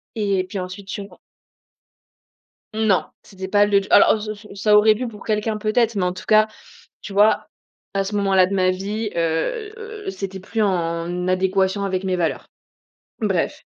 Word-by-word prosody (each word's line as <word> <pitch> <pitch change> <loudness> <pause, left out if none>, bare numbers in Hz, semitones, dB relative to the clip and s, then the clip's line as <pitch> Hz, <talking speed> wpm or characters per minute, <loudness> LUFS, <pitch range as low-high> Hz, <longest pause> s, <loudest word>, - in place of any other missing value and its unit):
Et 200 -3 0
puis 200 - -5
ensuite, 185 +2 -7
j'ai 200 - -4
ren 195 - -14 1.6
Non 215 -4 +2 0.2
c'était 190 -1 -8
pas 205 +1 +4
le 200 -1 +3
d 195 - -8
alors, 205 - +6
ç 210 - -6
ç 210 - -15 0.2
ça 210 -1 +5
aurait 215 +1 +6
pu 250 +3 -3
pour 210 -3 -11
quelqu'un, 215 0 -1
peut-être, 220 +2 +1
mais 190 - 0
en 180 - 0
tout 185 - -10
cas, 215 0 +5 0.6
tu 200 - -8
vois, 205 +2 +3 0.5
à 195 - +2
ce 205 +2 -5
moment-là 195 -2 +4
de 195 - -3
ma 185 -1 +3
vie, 205 +3 -3
heu, 170 - -1
heu, 435 -3 -7
c'était 195 - -6
plus 220 +3 -2
en 175 -1 -1
adéquation 190 +1 +1
avec 190 -1 -1
mes 185 -1 0
valeurs. 165 -3 -2 0.7
Bref. - - -1
200 Hz, 180 wpm, -21 LUFS, 185-215 Hz, 1.6 s, alors